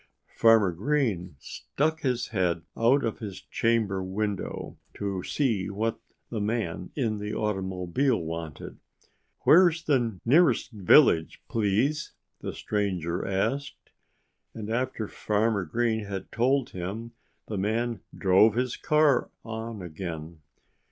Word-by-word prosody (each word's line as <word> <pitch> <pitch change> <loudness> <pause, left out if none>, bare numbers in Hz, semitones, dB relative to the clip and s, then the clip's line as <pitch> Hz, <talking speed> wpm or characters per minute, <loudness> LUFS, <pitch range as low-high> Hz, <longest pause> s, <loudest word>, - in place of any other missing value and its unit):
Farmer 110 -4 +5
Green 100 - -1
stuck 155 - -2
his 125 -3 -1
head 90 -5 0
out 125 +5 +3
of 115 - -3
his 100 -4 -6
chamber 110 -4 0
window, 100 +1 -4 0.2
to 100 -2 -3
see 110 -5 0
what 110 +3 -2 0.3
the 110 -3 -2
man 105 -5 -2
in 110 -7 -1
the 105 +1 -4
automobile 95 +4 0
wanted. 80 -2 -6 0.6
"Where's 170 0 +5
the 120 - +1
nearest 155 +3 +4
village, 100 - +4
please?" 115 +8 0 0.3
the - - -4
stranger 95 -4 -2
asked. 135 +9 -2 0.6
And 110 -1 -5
after 120 -2 -1
Farmer 105 -2 0
Green 110 +3 0
had 100 -1 -6
told 130 +2 +1
him 100 +6 -5 0.4
the 105 -3 -3
man 115 +2 -1 0.2
drove 100 +3 +5
his 125 0 -1
car 150 -4 +3 0.2
on 110 -2 -5
again. 80 -1 -6
110 Hz, 120 wpm, -27 LUFS, 95-120 Hz, 0.6 s, Farmer